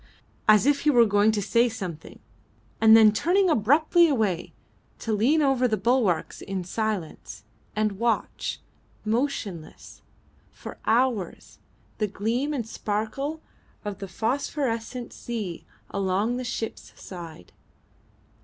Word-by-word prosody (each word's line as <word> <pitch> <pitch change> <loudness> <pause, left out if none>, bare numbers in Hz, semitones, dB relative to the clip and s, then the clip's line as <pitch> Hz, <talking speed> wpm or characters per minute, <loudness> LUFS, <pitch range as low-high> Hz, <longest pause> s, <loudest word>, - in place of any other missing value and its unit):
as 215 +1 +6
if 285 0 +3
he 300 - +2
was 240 -5 +5
going 205 +1 +4
to 210 -2 -1
say 235 +4 +3
something, 180 -8 -7 0.6
and 220 0 +8
then 220 -1 +7
turning 355 - +2
abruptly 310 - +4
away 215 - 0 0.5
to 225 - -3
lean 270 +9 +3
over 265 -2 +3
the 220 -2 0
bulwarks 210 -6 +1
in 195 -2 -4
silence, 205 -3 -4 0.3
and 215 -2 -1
watch, 235 0 -1 0.5
motionless, 215 - -3 0.5
for - - -10
hours, 235 -5 0 0.4
the 210 - +1
gleam 230 +8 -1
and 250 -7 -3
sparkle 225 +10 -3 0.4
of 205 -2 -5
the 195 - -6
phosphorescent 240 - -2
sea 215 -8 -6 0.2
along 200 +5 0
the 255 - -4
ship's 235 -2 -6
side. 165 - -10
225 Hz, 120 wpm, -25 LUFS, 205-255 Hz, 0.6 s, and